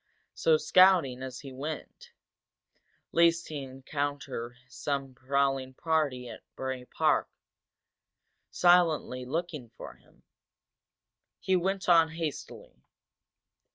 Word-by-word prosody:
So, 160 -1 +3
scouting 155 -5 +4
as 130 -1 -7
he 135 -2 -10
went, 145 +4 -7 1.0
least 170 0 +3
he 150 -2 -5
encounter 135 -2 -5
some 140 -1 -4
prowling 135 0 -1
party 150 -6 -1
from - - -9 0.2
Bray 130 -1 -4
Park - - +1 1.2
silently 170 -8 +3
looking 155 -3 -4
for 115 - -10
him, - - -27 1.2
he 190 - +1
went 190 +2 -1
on 165 -2 +6
hastily. 160 - -7
145 Hz, 95 wpm, -29 LUFS, 130-165 Hz, 1.2 s, on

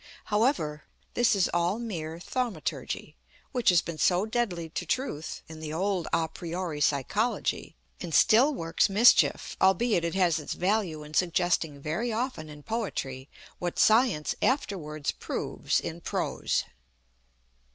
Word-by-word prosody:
However, 210 - +1 0.3
this 240 -2 +3
is 195 - +3
all 175 +4 +1
mere 165 -9 -5
Thaumaturgy, 225 -4 -3 0.4
which 245 -5 +2
has 175 -2 +4
been 165 -2 -6
so 180 +2 +3
deadly 220 -8 -2
to - - -4
Truth 205 - -3
in 160 0 -10
the 155 -1 -6
old 185 +1 -1
à 165 - +1
priori 170 -3 -4
psychology, 150 - 0 0.2
and 175 - -6
still 240 - +5
works 165 - +1
mischief, 215 +5 +4
albeit 190 0 +3
it 170 +1 -2
has 175 -4 +3
its 150 - -5
value 180 -5 0
in 150 0 -12
suggesting 170 -4 +1
very 165 +12 -2
often 225 - -3
in 150 -1 -11
Poetry 140 - -4 0.3
what 175 -1 -3
Science 220 -9 +3
afterwards 175 - -1
proves - - -2
in - - -6
Prose. - - -1
175 Hz, 135 wpm, -28 LUFS, 155-220 Hz, 0.4 s, still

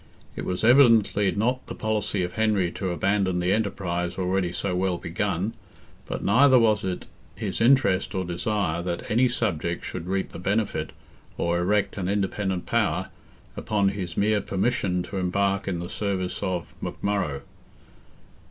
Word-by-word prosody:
It - - -5
was 90 +2 -2
evidently 115 -5 +5
not 125 +6 -1
the - - -6
policy 105 -3 -1
of 90 - -4
Henry 105 -5 +1
to 95 0 -3
abandon 95 +1 +1
the 90 +2 +2
enterprise 90 -5 -2
already 90 -1 0
so 90 +1 -2
well 90 -1 0
begun, 95 +5 -2 0.5
but - - -4
neither 130 +6 +6
was 110 -3 +3
it 95 -1 -3 0.3
his - - -3
interest 110 -7 +3
or 95 -1 -1
desire 90 -1 -1
that 85 +2 -4
any 125 +3 +4
subject 85 -8 -2
should 85 - -5
reap 95 +1 -1
the - - -8
benefit, 105 +3 -1 0.5
or 85 0 0
erect 100 +4 +1
an 95 -2 -2
independent 95 -2 -1
power, - - 0 0.5
upon 100 -3 +1
his 95 -4 -5
mere 105 0 +2
permission 95 -3 0
to 95 +2 -6
embark 100 +2 0
in 95 -3 -1
the 85 +1 -5
service 95 -2 -3
of 95 -3 -3
McMurrogh. 100 -9 -2
95 Hz, 150 wpm, -25 LUFS, 90-105 Hz, 0.5 s, neither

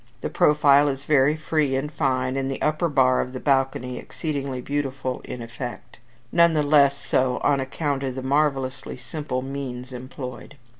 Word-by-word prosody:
The - - -3
profile 145 -1 +5
is 135 -1 -2
very 145 0 +3
free 155 -3 0
and 140 +3 -2
fine, 130 -3 0
and 135 0 -1
the 135 - -4
upper 155 +3 +1
bar 130 -3 +3
of 125 - -5
the 130 - -5
balcony 135 -3 0
exceedingly 140 -5 -4
beautiful 135 -1 -3
in 120 - -6
effect; 120 +1 -8 0.3
none 170 -1 +5
the 150 - +2
less 140 -1 +4
so 130 -2 0
on 145 -1 +3
account 135 +1 -2
of 130 -2 -3
the 130 - -5
marvellously 135 -2 0
simple 130 +1 -4
means 130 -2 -6
employed. 130 +2 -8
135 Hz, 165 wpm, -24 LUFS, 130-145 Hz, 0.3 s, profile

